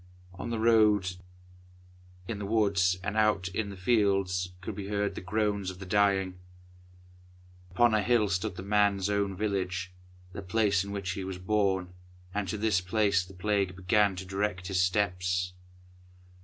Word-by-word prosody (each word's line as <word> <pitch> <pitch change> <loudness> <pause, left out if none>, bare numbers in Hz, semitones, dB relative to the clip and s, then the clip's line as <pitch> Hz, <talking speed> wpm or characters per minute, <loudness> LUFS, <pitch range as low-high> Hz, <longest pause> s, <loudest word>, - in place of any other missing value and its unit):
On 95 +6 -6
the 115 - -2
roads, 105 -5 +3 1.1
in 110 -3 -4
the 100 - -4
woods, 100 -4 +2
and 100 +1 -3
out 105 -4 +2
in 100 +2 -3
the 100 - -8
fields, 95 -3 +1
could 95 - -6
be 100 -2 -6
heard 100 0 -1
the - - -7
groans 100 0 -1
of 95 - -8
the 95 - -8
dying. 95 -2 +1 1.3
Upon 115 +6 +3
a - - +4
high 100 - -5
hill 120 -4 +3
stood 95 +1 -2
the 90 - -7
man's 100 -1 +2
own 100 -1 0
village, 95 -2 -2 0.4
the 100 - -6
place 100 0 +1
in 100 - -8
which 100 -2 -3
he 95 +1 -4
was 95 -1 -5
born, 95 -2 0 0.4
and 100 -1 -2
to 110 - -3
this 105 -3 +1
place 100 0 +2
the 95 +1 -14
Plague 100 -1 0
began 95 +2 +2
to 95 +1 -6
direct 95 -1 -2
his 95 -1 +1
steps. 90 -1 0
100 Hz, 170 wpm, -29 LUFS, 90-105 Hz, 1.3 s, a